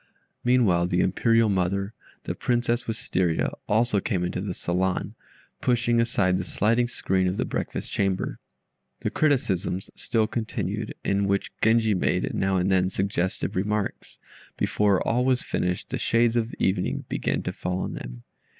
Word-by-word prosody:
Meanwhile 110 -9 +3
the 90 0 +1
Imperial 115 +4 +3
mother 100 +1 0 0.3
(the - - -3
Princess 120 0 0
Wistaria) 95 -6 0 0.2
also 110 0 +3
came 95 -2 -1
into 90 - -2
the 95 -3 -4
saloon, 90 +2 -1 0.5
pushing 120 -1 +2
aside 95 -6 +1
the - - -2
sliding 115 +6 +1
screen 95 -5 0
of 90 +2 -1
the - - 0
breakfast - - -4
chamber. 95 -2 -1 0.6
The - - -1
criticisms 95 - 0
still 110 -2 0
continued, 110 -1 -3
in 100 0 +1
which 100 0 0
Genji 110 -1 +4
made, 90 -1 0
now 95 0 +1
and 90 +2 +1
then, 95 -1 +3
suggestive 95 -1 -1
remarks. 105 +2 -2 0.4
Before 100 -3 +2
all 125 +2 +2
was 130 -1 +2
finished 90 0 -2
the - - -2
shades 115 0 +2
of 115 0 0
evening 95 -1 0
began - - -1
to - - -3
fall 90 0 -3
on - - -3
them. - - -8
100 Hz, 150 wpm, -26 LUFS, 90-115 Hz, 0.6 s, Genji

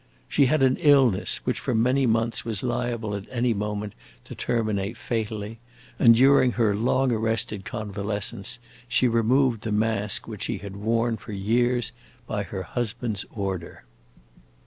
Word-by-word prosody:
She 140 - +3
had 155 +1 +2
an 130 0 +3
illness 135 -9 +4
which - - -1
for - - -2
many 125 +4 +2
months 115 +1 0
was 110 -4 -2
liable 120 -3 -2
at 100 0 -5
any 120 -1 +1
moment 105 0 -3 0.3
to - - -9
terminate 110 -3 -2
fatally, 110 -1 -4 0.4
and 115 -1 +7
during 130 0 +5
her 110 -4 +2
long 130 +4 +1
arrested 110 -3 -1
convalescence 105 -1 -2 0.3
she 125 +1 +2
removed 120 +1 +2
the 110 - -4
mask 105 -1 +1
which - - -8
she - - -2
had 100 -1 -8
worn 115 +2 0
for 110 - -9
years 120 +4 +1 0.3
by - - -2
her - - -5
husband's 115 -3 -3
order. 95 -5 -5
115 Hz, 145 wpm, -25 LUFS, 105-120 Hz, 0.4 s, and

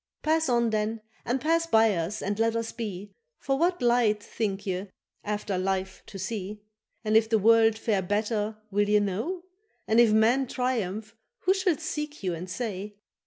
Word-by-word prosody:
—Pass 320 -1 +2
on 235 -2 +2
then 215 +1 -1 0.2
and 245 +3 0
pass 330 +4 +1
by 225 -6 +4
us 175 +4 -3
and 205 +2 -2
let 225 0 +2
us 230 0 -2
be, 205 -4 -6 0.3
For 270 - -1
what 350 -2 +1
light 235 -4 +3
think 205 -3 -3
ye 190 +1 -2 0.4
after 205 -2 -2
life 190 0 -2
to 200 - -9
see? 205 +1 -5 0.4
And 215 0 +1
if 220 0 +5
the 225 - +4
world 225 +1 +5
fare 215 -3 0
better 210 +2 -1
will 205 +1 +1
ye 210 0 +5
know? 220 - -2 0.4
And 220 +2 +4
if 235 -2 +6
man 235 +5 +3
triumph 225 -4 -2 0.3
who 375 - +3
shall 375 -5 +1
seek 300 -4 -5
you 180 -2 0
and 175 +2 -6
say? 205 -1 -4
220 Hz, 175 wpm, -27 LUFS, 205-240 Hz, 0.4 s, if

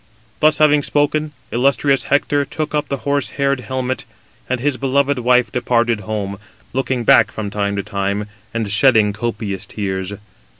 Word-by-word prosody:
Thus 155 0 +4
having 150 -1 +4
spoken, 150 +1 +1 0.2
illustrious 135 +2 +2
Hector 145 0 +2
took 150 +2 -4
up 150 -1 0
the 140 -2 -4
horse 140 -6 +1
haired 140 -1 +1
helmet, 130 +1 -3 0.5
and 130 0 0
his 140 +2 0
beloved 140 +1 +1
wife 125 -2 +3
departed 120 -2 +1
home, 105 -2 -4 0.3
looking 130 -1 -1
back - - +6
from 105 -2 -5
time 100 -1 -1
to 100 - -2
time, 100 0 -2 0.3
and 110 -3 -2
shedding 110 -2 +4
copious 105 -3 -4
tears. 95 -2 -3
125 Hz, 155 wpm, -19 LUFS, 105-140 Hz, 0.5 s, back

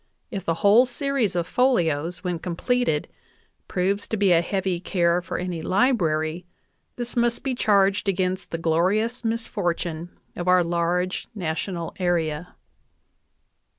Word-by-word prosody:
If 195 -5 -4
the 165 - +1
whole 225 +6 +7
series 270 -5 -1
of 170 -1 0
folios, 175 - +1
when 180 -2 -2
completed, 180 - 0 0.6
proves 195 +3 -1
to 220 - -2
be 200 -2 +3
a 170 -1 +5
heavy 190 0 -1
care 175 -1 +1
for - - -4
any 180 -2 -3
library, 175 -7 +1 0.5
this 240 -1 -5
must 235 -1 +1
be 270 -2 -1
charged 200 -3 +2
against 185 0 -1
the 165 - -3
glorious 190 +9 +1
misfortune 175 -7 -2 0.3
of 175 - -4
our 180 -1 +5
large 175 +2 -1
national 170 -1 -3
area. 170 -2 -1
180 Hz, 130 wpm, -24 LUFS, 170-215 Hz, 0.6 s, whole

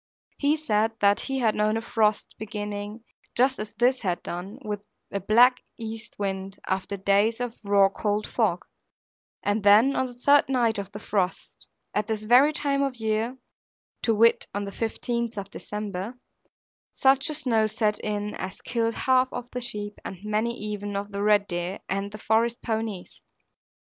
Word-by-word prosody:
He 295 +2 +3
said 225 -7 +1
that 200 0 +4
he 270 -1 -2
had 230 -4 +2
known 215 +1 +1
a - - -2
frost 215 -3 +1
beginning, 210 0 -5 0.3
just 260 +2 +3
as 215 0 -5
this 255 +2 +2
had 180 -5 -2
done, 185 +6 -6
with 210 -1 -3 0.3
a 200 - -1
black 240 +6 +5 0.2
east 225 -1 -7
wind, 195 -1 -3
after 190 +1 -2
days 200 +4 +2
of 245 -1 -4
raw 200 -1 +5
cold 205 +1 -1
fog, - - 0 0.8
and 205 +1 +1
then 215 +7 +6
on 260 - +1
the 245 - -11
third 280 +3 +4
night 235 -5 +2
of 200 0 -6
the 205 - -7
frost, 200 -3 -2 0.3
at 210 - 0
this 220 -2 -2
very 250 +7 +6
time 280 -2 0
of 275 -2 0
year 225 +2 -1 0.6
(to 225 - +2
wit 230 +2 +4
on 205 0 -1
the 200 - -6
15th 235 +1 -2
of 200 0 -5
December) 210 +2 -5 0.8
such 270 +2 +4
a 305 - -1
snow 230 -7 +2
set 215 -1 0
in 210 0 -3
as 190 - -6
killed 230 -1 -1
half 255 0 +3
of 245 0 -6
the 250 - -4
sheep 210 -3 -5
and 190 0 -8
many 215 +3 -1
even 205 -1 -4
of 200 +1 -3
the 200 0 -3
red 205 -1 +4
deer 175 +2 -2
and 195 +1 -2
the 215 - -7
forest 230 +2 +1
ponies. 220 -5 -4
215 Hz, 175 wpm, -26 LUFS, 205-240 Hz, 0.8 s, then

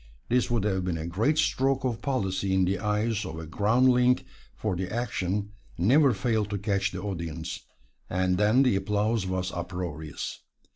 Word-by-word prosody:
This 125 +1 +2
would 120 -4 +1
have 95 -3 0
been 90 -2 -1
a 80 - -4
great 110 - +1
stroke 135 -3 +2
of 115 -3 -1
policy 95 -7 0
in 95 -1 +3
the 95 +1 0
eyes 105 +1 0
of 80 - -6
a 80 - -6
groundling, 125 +7 +3 0.4
for 105 -4 -2
the 90 +1 -3
action 105 -4 -2 0.3
never 135 - +5
failed 110 0 0
to 100 - -2
catch 100 0 0
the - - -6
audience, 85 -4 -4 0.5
and 90 0 +1
then 110 +6 +5
the 125 -6 +3
applause 105 +1 0
was 95 0 -2
uproarious. 85 -4 -5
100 Hz, 165 wpm, -27 LUFS, 90-115 Hz, 0.5 s, never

